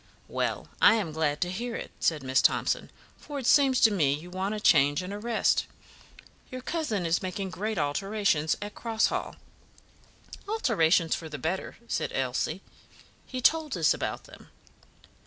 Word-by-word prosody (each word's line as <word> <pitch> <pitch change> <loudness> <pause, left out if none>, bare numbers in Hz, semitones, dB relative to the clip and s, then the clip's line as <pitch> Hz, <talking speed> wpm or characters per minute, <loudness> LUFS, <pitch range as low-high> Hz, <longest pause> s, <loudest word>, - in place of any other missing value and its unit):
"Well, - - -2
I - - +7
am 200 -8 -2
glad 150 -2 -1
to 180 0 0
hear 230 +5 -4
it," - - -6
said 155 -4 +1
Miss 130 0 +2
Thomson, - - +1 0.3
"for 290 - -8
it 265 - -4
seems 270 -1 +5
to 220 - +6
me 155 -9 +2
you 170 +4 -10
want 190 +3 -2
a - - -4
change 145 -3 +4
and 185 +2 -6
a 205 - -5
rest. 230 0 +1 0.8
Your 255 0 -7
cousin 250 - -2
is 165 +1 +1
making 190 +1 -4
great 215 +3 -3
alterations 160 +1 0
at 205 0 -7
Cross 225 -1 0
Hall." - - -3 1.1
"Alterations 185 - +2
for 160 - -4
the 150 - -6
better," 165 +8 -3
said - - -2
Elsie. 135 +7 -1 0.6
"He 255 -1 -5
told 310 - +2
us 160 -2 +4
about - - -4
them." - - -15
190 Hz, 165 wpm, -28 LUFS, 160-230 Hz, 1.1 s, I